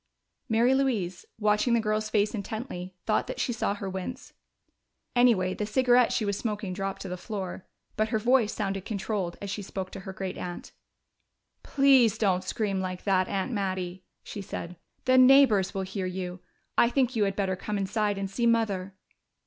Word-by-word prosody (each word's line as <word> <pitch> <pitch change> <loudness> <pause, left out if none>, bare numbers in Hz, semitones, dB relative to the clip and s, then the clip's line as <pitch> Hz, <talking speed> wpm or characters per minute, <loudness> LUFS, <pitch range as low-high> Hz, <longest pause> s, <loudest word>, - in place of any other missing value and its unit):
Mary 235 +3 +4
Louise, 225 -10 0
watching 210 +2 +2
the - - +3
girl's 215 0 -1
face 210 0 +1
intently, 200 -4 -5
thought 215 - +1
that - - -5
she 245 - 0
saw 205 -3 -1
her 200 -1 -5
wince. 190 +8 -6 0.8
Anyway, 225 -7 +4
the 210 - -3
cigarette 245 +3 +4
she 220 - 0
was 200 -1 0
smoking 210 -3 -3
dropped 195 0 -4
to - - -6
the 180 - -4
floor. 190 -1 -6 0.3
But 215 0 +1
her 220 - +1
voice 235 0 +3
sounded 195 -3 -3
controlled 200 -4 -3
as 200 - -4
she 205 - -3
spoke 190 -1 -5
to - - -7
her 190 0 -7
great 190 -1 -5
aunt. 175 -1 -6 0.9
"Please 265 -6 +4
don't 190 -4 +1
scream 195 0 -1
like 185 -1 -4
that, 185 -2 +2
Aunt 195 +5 -2
Mattie," 185 -3 -3 0.2
she 205 - -7
said. 180 -2 -6 0.3
"The 255 0 +5
neighbors 255 -8 +6
will 195 - -1
hear 190 0 -3
you. 185 0 -5 0.4
I 235 - +6
think 255 0 +1
you 215 -2 +3
had 195 -1 -1
better 195 -2 0
come 205 +3 -4
inside 205 +1 0
and 195 0 -2
see 235 +5 0
Mother." 200 -5 +1
205 Hz, 180 wpm, -28 LUFS, 190-230 Hz, 0.9 s, neighbors